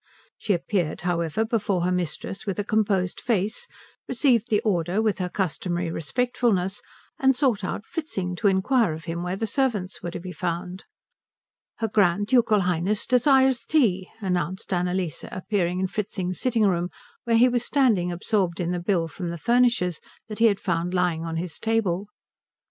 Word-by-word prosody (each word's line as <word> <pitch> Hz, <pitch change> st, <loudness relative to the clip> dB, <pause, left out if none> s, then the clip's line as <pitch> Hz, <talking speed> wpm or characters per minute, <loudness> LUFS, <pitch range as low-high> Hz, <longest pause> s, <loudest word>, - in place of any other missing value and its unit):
She 210 Hz, -, +1 dB
appeared, 175 Hz, -2 st, -1 dB
however, 175 Hz, +3 st, 0 dB
before 210 Hz, -5 st, 0 dB
her 180 Hz, -, +1 dB
mistress 180 Hz, +3 st, -3 dB
with 195 Hz, -, -2 dB
a 205 Hz, -, 0 dB
composed 200 Hz, -4 st, 0 dB
face, 220 Hz, -, -1 dB, 0.4 s
received 245 Hz, -2 st, +2 dB
the 210 Hz, -, +3 dB
order 180 Hz, -2 st, 0 dB
with 220 Hz, -3 st, +1 dB
her 180 Hz, -1 st, -1 dB
customary 175 Hz, -2 st, -2 dB
respectfulness, 195 Hz, -, 0 dB, 0.4 s
and 265 Hz, -1 st, +4 dB
sought 245 Hz, -7 st, +1 dB
out 195 Hz, +3 st, -4 dB
Fritzing 195 Hz, -, -4 dB
to 210 Hz, -, +2 dB
inquire 195 Hz, +1 st, +2 dB
of 155 Hz, 0 st, -8 dB
him 170 Hz, 0 st, -3 dB
where 180 Hz, +1 st, -2 dB
the 225 Hz, -, -2 dB
servants 215 Hz, -6 st, -1 dB
were 175 Hz, -, -4 dB
to -, -, -6 dB
be 180 Hz, +1 st, -7 dB
found. 180 Hz, +1 st, -4 dB, 0.9 s
"Her 225 Hz, -, -1 dB
Grand 205 Hz, -2 st, +2 dB
Ducal 225 Hz, -3 st, +3 dB
Highness 180 Hz, +3 st, 0 dB
desires 265 Hz, 0 st, +4 dB
tea," 195 Hz, -, +2 dB
announced 185 Hz, 0 st, -2 dB
Annalise, 180 Hz, -3 st, -1 dB
appearing 185 Hz, -2 st, -1 dB
in 190 Hz, -, +1 dB
Fritzing's 190 Hz, -2 st, -3 dB
sitting 235 Hz, -4 st, +1 dB
room, 175 Hz, -2 st, +1 dB, 0.4 s
where 230 Hz, -1 st, +3 dB
he 245 Hz, +2 st, +6 dB
was 245 Hz, -1 st, 0 dB
standing 230 Hz, -11 st, +2 dB
absorbed 180 Hz, 0 st, -1 dB
in 175 Hz, -1 st, -1 dB
the 180 Hz, -, -1 dB
bill 175 Hz, -2 st, +1 dB
from 175 Hz, +2 st, -5 dB
the 170 Hz, -, -4 dB
furnishers 235 Hz, -5 st, +2 dB, 0.3 s
that 215 Hz, -1 st, -7 dB
he 230 Hz, -, +5 dB
had 205 Hz, -3 st, +4 dB
found 175 Hz, 0 st, -1 dB
lying 175 Hz, -3 st, +1 dB
on 165 Hz, 0 st, -3 dB
his 170 Hz, -1 st, -4 dB
table. 210 Hz, -4 st, 0 dB
190 Hz, 170 wpm, -25 LUFS, 175-225 Hz, 0.9 s, he